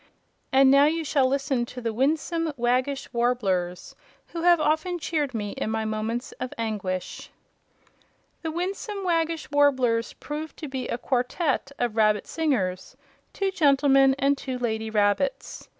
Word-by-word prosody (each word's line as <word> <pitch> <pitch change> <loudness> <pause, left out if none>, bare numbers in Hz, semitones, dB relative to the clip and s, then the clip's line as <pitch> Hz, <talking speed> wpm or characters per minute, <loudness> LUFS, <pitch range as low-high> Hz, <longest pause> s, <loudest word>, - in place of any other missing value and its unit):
And 265 0 +6
now 280 +1 +6
you 325 +2 +1
shall 280 -3 +2
listen 270 -2 0
to 250 - -8
the 230 -2 -3
Winsome 315 +6 0
Waggish 255 +3 0
Warblers, 195 -8 -1 0.3
who 335 - -5
have 345 0 +5
often 315 +4 0
cheered 295 -5 -2
me 205 -2 -3
in - - -3
my 220 0 -1
moments 220 +3 -3
of 255 - -5
anguish." 205 -5 -4 1.1
The 325 - -3
Winsome 390 +4 -4
Waggish 330 -4 -1
Warblers 260 -5 +2
proved 300 +1 -7
to 310 - -6
be 265 -2 -4
a - - -2
quartette 265 +4 -1
of 240 -3 -1
rabbit 215 -2 +3
singers, 255 - -2 0.3
two 390 -1 -1
gentlemen 275 -5 +4
and 275 +1 +2
two 260 -2 -4
lady 220 -2 -2
rabbits. 210 +5 0
265 Hz, 145 wpm, -25 LUFS, 230-310 Hz, 1.1 s, And